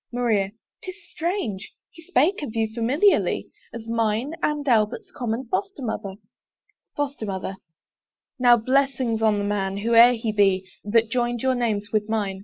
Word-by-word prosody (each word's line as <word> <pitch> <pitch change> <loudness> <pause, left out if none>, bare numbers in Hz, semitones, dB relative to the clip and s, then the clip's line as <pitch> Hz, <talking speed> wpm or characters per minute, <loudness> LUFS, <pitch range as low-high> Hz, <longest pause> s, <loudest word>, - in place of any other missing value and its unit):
MARIA. 220 -5 0 0.3
'Tis 370 -1 -7 0.2
strange! 315 - -3 0.2
he 330 - -15
spake 340 +1 +1
of 240 -6 -6
you 225 -1 +1
familiarly 270 - +2 0.2
As 230 -1 -9
mine 230 +4 0
and 295 -1 -1
Albert's 240 - +1
common 245 -4 -3
Foster 390 - -3
mother. 210 -4 -4 0.8
FOSTER 280 -6 -3
MOTHER. 190 0 -4 0.8
Now 245 -1 +6
blessings 255 -1 0
on 215 -2 +3
the 205 - -1
man, 200 -1 -1
whoe'er 230 +3 +6
he 225 -2 -2
be, 195 -2 +2 0.2
That 225 +2 +2
joined 240 -1 -1
your 260 0 +2
names 220 -4 -2
with 215 0 0
mine! 200 -4 -2
230 Hz, 150 wpm, -24 LUFS, 210-265 Hz, 0.8 s, Now